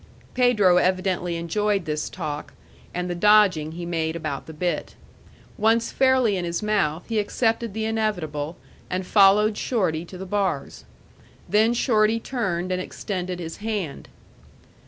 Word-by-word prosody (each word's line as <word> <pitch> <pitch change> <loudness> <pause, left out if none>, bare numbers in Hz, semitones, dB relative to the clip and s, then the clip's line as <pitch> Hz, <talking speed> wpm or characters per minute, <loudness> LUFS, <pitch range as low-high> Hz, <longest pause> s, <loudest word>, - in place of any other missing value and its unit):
Pedro 215 -8 +4
evidently 185 -1 +1
enjoyed 195 +3 0
this 150 0 -2
talk, 150 0 -5 0.4
and 180 +1 -3
the 175 - -2
dodging 185 -5 +4
he 170 +1 -6
made 165 -1 -2
about 155 -4 -4
the - - -7
bit. 170 0 -3 0.6
Once 225 +2 +2
fairly 260 -5 +3
in 180 - -2
his 170 +4 -3
mouth, 195 -7 0
he 225 -2 0
accepted 225 +1 0
the 220 0 -1
inevitable, 175 -9 -2 0.3
and 185 +1 -2
followed 205 +2 +5
Shorty 180 -10 0
to 185 - -10
the 190 - -6
bars. 190 -7 -2 0.6
Then 220 +3 +3
Shorty 225 -2 +2
turned 185 -8 -2
and 185 0 0
extended 185 -1 -4
his 165 -2 -6
hand. 205 -8 -4
190 Hz, 140 wpm, -24 LUFS, 170-215 Hz, 0.6 s, followed